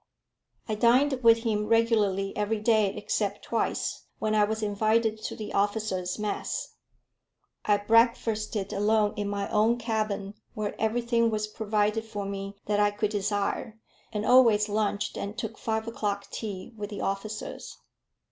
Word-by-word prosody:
I 220 Hz, -, -1 dB
dined 250 Hz, +5 st, +3 dB
with 230 Hz, -1 st, +5 dB
him 210 Hz, -2 st, 0 dB
regularly 215 Hz, -4 st, +2 dB
every 210 Hz, +1 st, 0 dB
day 215 Hz, -1 st, +3 dB
except 205 Hz, -1 st, -2 dB
twice, 230 Hz, -, -2 dB
when 215 Hz, 0 st, -1 dB
I 210 Hz, -1 st, +4 dB
was 220 Hz, +1 st, -3 dB
invited 215 Hz, +1 st, +1 dB
to -, -, -4 dB
the 215 Hz, -1 st, -6 dB
officers' 200 Hz, -3 st, 0 dB
mess. 210 Hz, -1 st, -3 dB, 0.9 s
I 205 Hz, -1 st, +4 dB
breakfasted 215 Hz, -1 st, +2 dB
alone 210 Hz, +1 st, +2 dB
in 205 Hz, -1 st, -2 dB
my 200 Hz, -1 st, -2 dB
own 220 Hz, +3 st, +3 dB
cabin, 215 Hz, -4 st, -2 dB, 0.2 s
where 210 Hz, -1 st, -2 dB
everything 235 Hz, +1 st, +2 dB
was 215 Hz, -1 st, -1 dB
provided 215 Hz, 0 st, 0 dB
for 210 Hz, -3 st, -5 dB
me 200 Hz, 0 st, -5 dB
that 205 Hz, 0 st, +1 dB
I 205 Hz, 0 st, +4 dB
could 205 Hz, 0 st, -2 dB
desire, 205 Hz, +2 st, -2 dB, 0.3 s
and 210 Hz, -1 st, -2 dB
always 230 Hz, -5 st, +6 dB
lunched 210 Hz, 0 st, -1 dB
and 205 Hz, +2 st, -5 dB
took 225 Hz, -4 st, -5 dB
five 220 Hz, 0 st, -2 dB
o'clock 205 Hz, -3 st, -3 dB
tea 205 Hz, -1 st, -6 dB
with 205 Hz, -1 st, -5 dB
the 205 Hz, -, -6 dB
officers. 210 Hz, +2 st, -4 dB
215 Hz, 145 wpm, -28 LUFS, 205-225 Hz, 0.9 s, always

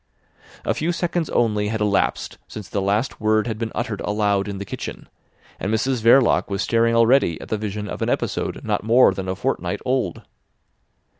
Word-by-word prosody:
A -, -, +1 dB
few 165 Hz, +3 st, -1 dB
seconds 175 Hz, -1 st, -1 dB
only 105 Hz, -3 st, +1 dB
had 110 Hz, +1 st, -2 dB
elapsed 105 Hz, -2 st, 0 dB
since 105 Hz, -4 st, -8 dB
the 100 Hz, +5 st, -2 dB
last 105 Hz, +7 st, -1 dB
word 110 Hz, 0 st, +2 dB
had 110 Hz, -3 st, -4 dB
been 115 Hz, -1 st, -3 dB
uttered 120 Hz, -4 st, -3 dB
aloud 105 Hz, -1 st, 0 dB
in 100 Hz, -1 st, -4 dB
the 100 Hz, -, -6 dB
kitchen, -, -, -7 dB, 0.5 s
and 100 Hz, -, -2 dB
Mrs 120 Hz, +2 st, 0 dB
Verloc 120 Hz, +1 st, +4 dB
was 100 Hz, -1 st, -1 dB
staring 115 Hz, 0 st, +2 dB
already 115 Hz, -, +4 dB
at -, -, -10 dB
the 110 Hz, -, 0 dB
vision 105 Hz, 0 st, -4 dB
of -, -, -6 dB
an -, -, 0 dB
episode -, -, -2 dB
not -, -, 0 dB
more 115 Hz, -2 st, +5 dB
than 95 Hz, -1 st, -5 dB
a 95 Hz, -, -1 dB
fortnight -, -, -2 dB
old. 125 Hz, -9 st, -1 dB
110 Hz, 190 wpm, -22 LUFS, 100-120 Hz, 0.5 s, more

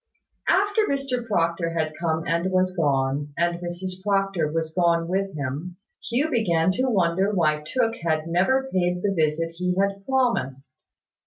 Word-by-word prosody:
After 410 Hz, +3 st, +3 dB
Mr 270 Hz, -4 st, -2 dB
Proctor 170 Hz, -4 st, 0 dB
had 155 Hz, -1 st, -1 dB
come 160 Hz, -1 st, -1 dB
and 170 Hz, +2 st, 0 dB
was 185 Hz, 0 st, +1 dB
gone, 140 Hz, -2 st, 0 dB
and 170 Hz, 0 st, 0 dB
Mrs 180 Hz, +2 st, -5 dB
Proctor 195 Hz, -5 st, 0 dB
was 160 Hz, 0 st, -2 dB
gone 170 Hz, -1 st, +2 dB
with 195 Hz, +1 st, -1 dB
him, 150 Hz, +6 st, -4 dB, 0.3 s
Hugh 275 Hz, +7 st, 0 dB
began 185 Hz, -, +2 dB
to 255 Hz, +7 st, 0 dB
wonder 190 Hz, -1 st, +2 dB
why 155 Hz, -6 st, +1 dB
Tooke 225 Hz, +7 st, 0 dB
had 160 Hz, -2 st, -1 dB
never 190 Hz, +11 st, +1 dB
paid 180 Hz, -1 st, 0 dB
the 200 Hz, -1 st, +1 dB
visit 165 Hz, 0 st, 0 dB
he 180 Hz, 0 st, 0 dB
had 200 Hz, 0 st, 0 dB
promised. 235 Hz, -, 0 dB
180 Hz, 155 wpm, -24 LUFS, 165-200 Hz, 0.3 s, After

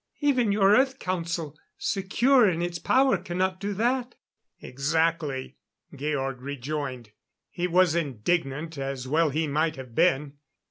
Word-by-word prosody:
"Even 255 Hz, -7 st, +2 dB
your 200 Hz, 0 st, +5 dB
Earth 265 Hz, +1 st, +2 dB
Council, 170 Hz, -, -3 dB, 0.2 s
secure 225 Hz, +5 st, +3 dB
in 170 Hz, -1 st, -1 dB
its 175 Hz, -1 st, -3 dB
power, 265 Hz, +9 st, +3 dB
cannot 185 Hz, +2 st, -2 dB
do 205 Hz, +1 st, -3 dB
that." 245 Hz, +4 st, 0 dB, 0.4 s
"Exactly," 150 Hz, 0 st, -1 dB, 0.4 s
Georg 135 Hz, -3 st, -2 dB
rejoined. 135 Hz, -3 st, -5 dB, 0.4 s
He 175 Hz, +1 st, -2 dB
was 180 Hz, -1 st, +3 dB
indignant, 150 Hz, +1 st, -2 dB
as 135 Hz, -1 st, -4 dB
well 155 Hz, +3 st, +2 dB
he 155 Hz, +3 st, 0 dB
might 155 Hz, +2 st, 0 dB
have 130 Hz, -4 st, -10 dB
been. 145 Hz, -2 st, +1 dB
165 Hz, 130 wpm, -26 LUFS, 140-190 Hz, 0.4 s, your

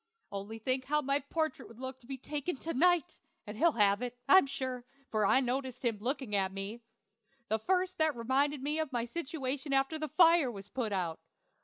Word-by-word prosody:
Only 200 Hz, +3 st, -5 dB
think 255 Hz, +3 st, -1 dB
how 300 Hz, +2 st, +1 dB
my 275 Hz, +1 st, +1 dB
portrait 315 Hz, +1 st, -2 dB
would 230 Hz, -, -15 dB
look 260 Hz, 0 st, -6 dB, 0.2 s
taken 295 Hz, +2 st, -3 dB
to 330 Hz, +5 st, -4 dB
night! 350 Hz, +2 st, +2 dB, 0.3 s
and 210 Hz, -, -7 dB
he'll 330 Hz, +7 st, +3 dB
have 205 Hz, -1 st, +3 dB
it, 245 Hz, 0 st, -4 dB
I'm 375 Hz, -7 st, +7 dB
sure, 260 Hz, -2 st, -4 dB, 0.3 s
for 215 Hz, -2 st, +2 dB
I 260 Hz, -, +5 dB
noticed 255 Hz, 0 st, -2 dB
him 225 Hz, -3 st, 0 dB
looking 255 Hz, -1 st, -2 dB
at 190 Hz, -1 st, +1 dB
me 195 Hz, +4 st, -5 dB, 0.7 s
the 220 Hz, +1 st, +1 dB
first 370 Hz, -, 0 dB
that 315 Hz, -2 st, +2 dB
reminded 265 Hz, +4 st, 0 dB
me 300 Hz, +2 st, 0 dB
of 310 Hz, -3 st, -2 dB
my 240 Hz, -2 st, -1 dB
situation 275 Hz, -1 st, -3 dB
after 270 Hz, +4 st, +1 dB
the 310 Hz, -1 st, -3 dB
fire 335 Hz, -5 st, +5 dB
was 200 Hz, -2 st, -10 dB
put 245 Hz, -5 st, -2 dB
out. 175 Hz, -5 st, -2 dB
260 Hz, 190 wpm, -32 LUFS, 225-300 Hz, 0.7 s, I'm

